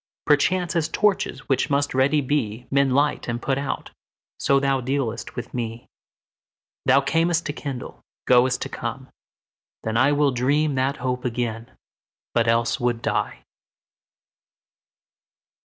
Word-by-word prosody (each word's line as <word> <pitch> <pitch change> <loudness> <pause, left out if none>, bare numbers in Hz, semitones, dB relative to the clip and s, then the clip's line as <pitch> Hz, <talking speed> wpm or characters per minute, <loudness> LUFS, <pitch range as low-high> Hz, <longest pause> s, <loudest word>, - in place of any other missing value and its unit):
Perchance, 175 +5 +2
as 160 -2 +1
torches, 205 +3 0
which 135 +2 +1
must 145 0 +1
ready 135 +3 +3
be, 125 -4 -1
Men 140 0 +3
light 145 +3 +1
and 120 0 -2
put 135 +2 -1
out, 140 - -4 0.5
so 140 0 +3
thou 135 -1 +1
dealst 125 -3 -2
with - - -6
me. 115 -1 -4 1.0
Thou 140 - +6
cam'st 165 +4 +1
to 145 - -2
kindle, 140 -4 -6 0.2
goest 125 0 +4
to - - -6
come: - - -5 0.7
then 110 0 -1
IWill 140 +2 +3
dream 145 +5 +1
that 130 +1 0
hope 125 0 -2
again, 120 -1 -3 0.6
but 115 -1 +2
else 115 +1 +2
would 120 -2 -1
die. - - -1
135 Hz, 130 wpm, -23 LUFS, 120-145 Hz, 1.0 s, Thou